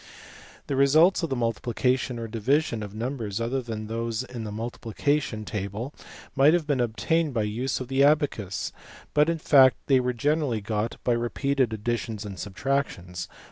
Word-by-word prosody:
The 140 - -2
results 155 +8 +5
of 165 - -2
the 135 - -1
mul 115 -2 +1
tiplication 125 +1 -1
or 115 -1 -4
division 115 +2 0
of 105 0 -7
numbers 115 -3 -3
other 120 +3 -1
than 110 -3 -5
those 115 +1 -2
in 125 -3 -7
the 105 - -5
multiplication 115 +2 -2
table 105 +6 -4 0.4
might 145 +4 +6
have 170 -3 0
been 145 -3 0
obtained 125 +7 0
by 110 - +2
the 105 - -1
use 125 +5 -2
of 130 - -5
the 135 +1 +2
abacus, 140 - +1 0.4
but 150 +2 +4
in 165 - 0
fact 130 -7 +6
they 135 -2 +4
were 125 0 0
generally 145 -1 0
got 105 +2 -2
by 125 - +2
repeated 125 +2 0
additions 110 -1 -3
and 100 -3 -7
subtractions. 100 -5 -2
120 Hz, 175 wpm, -26 LUFS, 110-140 Hz, 0.4 s, might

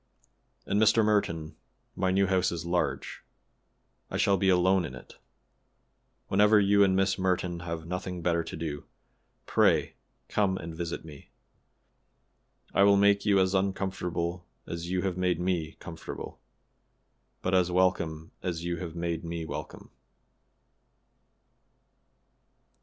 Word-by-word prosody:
"And, 100 +2 +1
Mr. 110 +1 +5
Merton, 85 -7 0 0.4
my 95 0 0
new 95 +1 +3
house 95 -1 +1
is 85 0 -4
large. 85 +1 -2 0.9
I - - -3
shall 100 - +3
be 95 0 +2
alone 95 +1 +4
in 65 - -6
it. - - -14 1.1
Whenever 105 +2 +5
you 100 0 +5
and 95 -1 +3
Miss 95 0 +1
Merton 90 -2 0
have 85 -2 -5
nothing 90 0 -5
better 85 -1 +1
to - - -6
do, 75 -3 -5 0.6
pray - - +3 0.3
come 95 -3 +1
and 80 -1 -7
visit 85 -1 -4
me. 75 -3 -12 1.4
I - - +3
will 100 0 +6
make 100 +1 +3
you 100 -1 +5
as 95 0 +2
uncomfortable 90 -2 -2 0.2
as 85 +1 -5
you 90 0 0
have 95 -2 -1
made 90 -2 +1
me 90 -3 -1
comfortable, 80 -1 -9 1.0
but 90 - -1
as 90 -1 +3
welcome 85 -3 0
as 85 -2 -3
you 85 0 -2
have 85 -1 -6
made 85 -1 -2
me 85 -1 -4
welcome." - - -7
90 Hz, 130 wpm, -28 LUFS, 85-95 Hz, 1.4 s, will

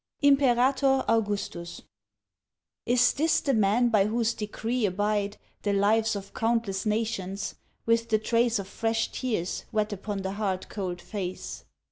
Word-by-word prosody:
1881. 270 -1 +4
IMPERATOR - - -7
AUGUSTUS 205 -6 -2 1.1
Is 245 +1 +4
this 325 +3 +2
the 275 - 0
man 220 +2 +3
by 210 -3 +3
whose 230 +1 +1
decree 220 +2 -2
abide 205 +2 -1 0.2
The 205 - 0
lives 215 +3 +2
of 195 -1 -7
countless 225 -3 0
nations, 210 -3 -2 0.3
with 230 0 +2
the 220 - +4
trace 230 +2 +2
Of 200 -2 -5
fresh 225 +2 -1
tears 215 -9 -2
wet 215 -1 0
upon 200 0 -4
the 190 - -2
hard 195 -2 -2
cold 180 -4 -4
face? 185 -4 -5
215 Hz, 140 wpm, -27 LUFS, 200-235 Hz, 1.1 s, 1881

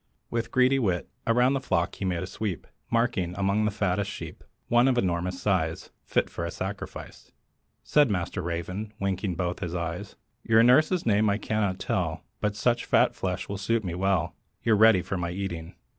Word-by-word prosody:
With 115 0 -1
greedy 130 +1 +3
wit, 95 -8 0 0.2
Around 125 +3 +4
the 135 - +1
flock 95 -10 0
he 100 - -5
made 90 -1 -1
a - - -3
sweep, 95 0 -4 0.2
Marking, 115 -7 0
among 100 +2 +1
the - - +2
fattest 100 -1 -1
sheep, - - -8 0.2
One 120 +2 +4
of 130 -2 +2
enormous 90 -2 0
size, 90 -5 -1
Fit - - +1
for - - -6
a - - -2
sacrifice. - - -7 0.5
Said 145 -3 +4
Master 90 -1 -2
Raven, 90 +5 -4
winking 95 -1 -1
both 90 0 -2
his 85 0 -4
eyes, 85 +3 -4 0.3
"Your 115 0 +4
nurse's 155 +9 +4
name 105 -1 +3
I 100 - +2
cannot 105 -4 -1
tell, - - -2 0.2
But 105 0 -1
such 120 +2 +1
fat - - +3
flesh 90 -1 -3
will 100 -1 -4
suit 115 +2 0
me 90 -3 -3
well: 95 -2 0 0.3
You're 115 -2 +4
ready 105 -3 +6
for 100 - -3
my 85 -1 -2
eating." 85 -3 -5
100 Hz, 185 wpm, -27 LUFS, 90-115 Hz, 0.5 s, ready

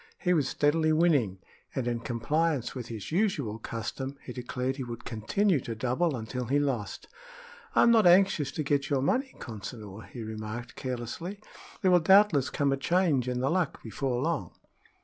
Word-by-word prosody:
He 180 - +1
was 150 -6 +2
steadily 155 +2 +2
winning, 150 - +3 0.4
and 130 -3 -1
in 120 -1 0
compliance 140 +5 0
with 125 -3 -6
his 110 -4 -7
usual 155 - 0
custom, 130 +5 -5
he 125 - -7
declared 125 +1 -3
he 135 - -3
would 120 -2 -7
continue 145 - +1
to 115 -2 -5
double 130 +7 0
until 125 +2 -4
he 135 +5 +1
lost. 130 -8 -2 0.7
"I'm 235 - +6
not 220 -5 +6
anxious 175 -6 +4
to 155 - -2
get 140 -1 0
your 135 -3 +1
money, 260 - 0
Consinor," 105 -1 -8
he 120 - -7
remarked, 110 +2 -6
carelessly. 130 - -5 0.4
"There 185 - +5
will 180 - +7
doubtless 185 -5 +5
come 140 -1 +1
a 135 - +1
change 155 -4 +2
in 125 0 -1
the 135 - +1
luck 180 -1 -1
before 125 +2 -2
long." 165 -2 -2
135 Hz, 170 wpm, -29 LUFS, 120-165 Hz, 0.7 s, will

